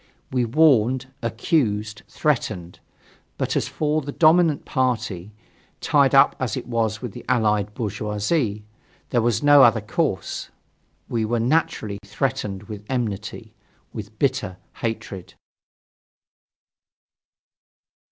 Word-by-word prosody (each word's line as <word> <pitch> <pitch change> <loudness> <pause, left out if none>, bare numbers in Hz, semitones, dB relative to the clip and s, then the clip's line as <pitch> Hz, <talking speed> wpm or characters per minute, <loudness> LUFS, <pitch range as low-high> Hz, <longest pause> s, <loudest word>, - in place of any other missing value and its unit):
We 125 -2 +1
warned, 130 -1 +3
accused, 110 - -1
threatened. 105 - -2 0.6
But - - -1
as - - 0
for 155 0 0
the 145 0 -6
dominant 160 0 +4
party, 110 -7 -1 0.5
tied - - +3
up - - +6
as - - -2
it - - -5
was 115 -2 -1
with 120 - -4
the - - -10
Allied 105 -4 +1
bourgeoisie, 105 - -1 0.5
there 120 - +3
was 120 +4 +1
no 145 -1 +7
other 115 -3 +6
course; 110 - -2 0.6
we 115 -2 -1
were 115 +2 0
naturally 115 -6 0
threatened 105 -3 -3
with 105 -1 -8
enmity, 110 -2 -4 0.4
with 110 0 -8
bitter 130 -9 -1 0.2
hatred. 105 -5 -5
115 Hz, 110 wpm, -23 LUFS, 105-130 Hz, 0.6 s, no